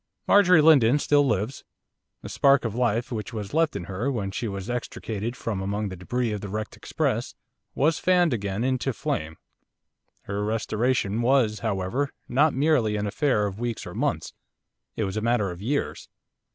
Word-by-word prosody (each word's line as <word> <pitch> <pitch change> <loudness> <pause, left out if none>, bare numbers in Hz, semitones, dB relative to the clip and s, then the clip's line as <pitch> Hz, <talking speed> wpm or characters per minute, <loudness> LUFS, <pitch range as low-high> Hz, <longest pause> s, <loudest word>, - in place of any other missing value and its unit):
Marjorie 180 -5 +6
Lindon 140 -5 +6
still 145 -1 +3
lives. 110 +3 -1 0.6
The - - -7
spark 140 -2 +3
of 110 - -2
life 120 0 0
which 110 +1 -4
was 105 -2 -5
left 160 -4 +2
in 100 - -3
her, 100 +9 -2
when 100 -6 -3
she 115 - -3
was 100 -2 -5
extricated 115 -2 -4
from 105 -4 -3
among 100 +1 -2
the 95 - -6
débris 115 +6 -2
of 105 - -4
the 100 - -5
wrecked 110 +2 -4
express, - - -2 0.4
was 155 +3 +2
fanned 180 -5 +3
again 100 -1 -2
into 130 0 0
flame. 80 -6 -3 0.9
Her 100 +1 -3
restoration 110 0 0
was, 120 -4 +2
however, 110 +6 -1 0.2
not 145 +3 +3
merely 135 -7 +2
an 105 0 -1
affair 105 0 +1
of 100 +1 -5
weeks 120 -2 -3
or - - -8
months, - - -2 0.6
it 110 - -1
was 95 0 -3
a - - -1
matter 115 -4 +1
of 90 +1 -9
years. 140 +7 -2
115 Hz, 175 wpm, -25 LUFS, 100-135 Hz, 0.9 s, Marjorie